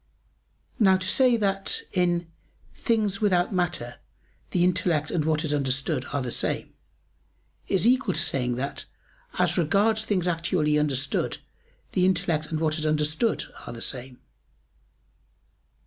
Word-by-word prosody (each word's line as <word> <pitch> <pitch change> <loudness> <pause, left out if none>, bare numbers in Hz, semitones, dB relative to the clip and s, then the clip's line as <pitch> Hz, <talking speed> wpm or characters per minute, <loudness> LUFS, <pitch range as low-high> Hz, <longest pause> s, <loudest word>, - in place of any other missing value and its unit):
Now 190 -4 +5
to 185 0 -5
say 250 +2 +4
that 195 -2 0
in 175 -1 +1 0.5
"things 215 -4 0
without 185 -2 +2
matter 170 -10 -2 0.5
the 175 - +1
intellect 170 -4 +1
and 155 -4 0
what 155 0 +1
is 150 -2 0
understood 135 0 0
are 145 -2 -1
the 125 - -4
same," - - -1 0.9
is 195 +1 +1
equal 245 -5 +3
to - - +1
saying 125 -2 +1
that 140 +3 -4 0.5
"as - - +2
regards 205 +7 +2
things 185 -5 0
actually 165 -3 +1
understood 140 -2 0 0.5
the 180 - +2
intellect 165 -4 0
and 160 - -3
what 155 0 0
is 155 - -2
understood 155 +8 +1 0.2
are - - -6
the 115 - -8
same." 125 +1 -5
170 Hz, 135 wpm, -26 LUFS, 150-190 Hz, 0.9 s, Now